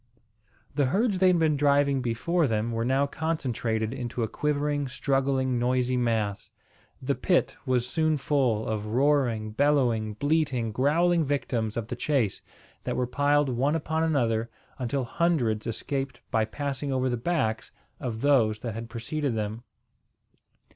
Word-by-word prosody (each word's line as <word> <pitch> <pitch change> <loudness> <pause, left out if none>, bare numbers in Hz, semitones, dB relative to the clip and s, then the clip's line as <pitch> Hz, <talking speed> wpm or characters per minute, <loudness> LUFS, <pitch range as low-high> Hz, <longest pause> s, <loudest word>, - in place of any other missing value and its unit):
The 140 -1 +2
herds 200 - +1
they 190 - +5
had 180 -1 +4
been 160 -2 +2
driving 140 -1 +3
before 145 +8 0
them 110 0 -1
were 115 0 -1
now 135 +3 +2
concentrated 125 -8 -2
into 120 -2 -3
a - - 0
quivering, 145 +1 -1
struggling, 130 -1 0
noisy 125 +1 +1
mass. 110 -5 -1 0.5
The 140 +2 +1
pit 180 +5 +1
was 125 -1 +1
soon 155 +1 +1
full 130 -6 +1
of 105 -1 -3
roaring, 120 -3 +1
bellowing, 120 -5 +1
bleating, 140 -3 0
growling 165 +8 +2
victims 120 -6 -1
of 115 - -2
the - - -3
chase, 120 -6 0 0.4
that - - -2
were 125 - 0
piled 145 +3 +2
one 135 +5 +1
upon 160 0 -1
another, 115 -8 +1 0.3
until 130 +2 -1
hundreds 120 -7 0
escaped 135 +4 -3
by 110 -1 +2
passing 140 +4 -3
over 130 0 +1
the 125 - 0
backs 115 -4 -1 0.3
of 115 -3 -4
those 115 -7 +3
that 115 -3 -4
had 115 +1 -6
preceded 125 +3 -3
them. 110 +1 -3
130 Hz, 145 wpm, -27 LUFS, 115-145 Hz, 0.5 s, they